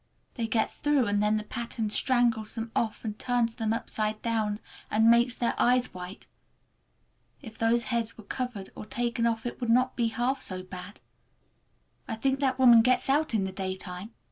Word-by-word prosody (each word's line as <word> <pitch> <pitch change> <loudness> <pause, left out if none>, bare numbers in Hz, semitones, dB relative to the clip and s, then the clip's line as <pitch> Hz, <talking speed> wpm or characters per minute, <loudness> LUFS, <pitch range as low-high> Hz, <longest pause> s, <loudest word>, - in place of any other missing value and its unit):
They 230 -3 -2
get 220 0 +1
through, 290 -4 +1
and 205 -1 +1
then 210 +1 +2
the 215 - -3
pattern 225 -1 -4
strangles 235 -3 +2
them 225 0 -4
off 225 0 -1
and 210 -1 -4
turns 245 -2 +1
them 225 -2 -2
upside 215 -1 -2
down, 215 -3 0 0.3
and 220 +2 +5
makes 240 +1 +4
their 240 - 0
eyes 250 +1 +3
white! 180 +3 -8 1.2
If 225 -3 -10
those 230 +1 +3
heads 230 -1 -1
were 220 - -11
covered 220 -2 -5
or 215 - -8
taken 235 0 0
off 230 0 -1
it 240 - -5
would 240 - -2
not 255 +2 +3
be 235 -2 +1
half 245 +4 -1
so 185 -1 -4
bad. 185 +2 -9 1.1
I 225 - -3
think 265 +4 0
that 265 -2 +1
woman 240 -3 +8
gets 255 +3 +2
out 295 -3 +1
in 205 - +2
the 190 - -3
daytime! 190 0 -5
230 Hz, 185 wpm, -28 LUFS, 215-245 Hz, 1.2 s, woman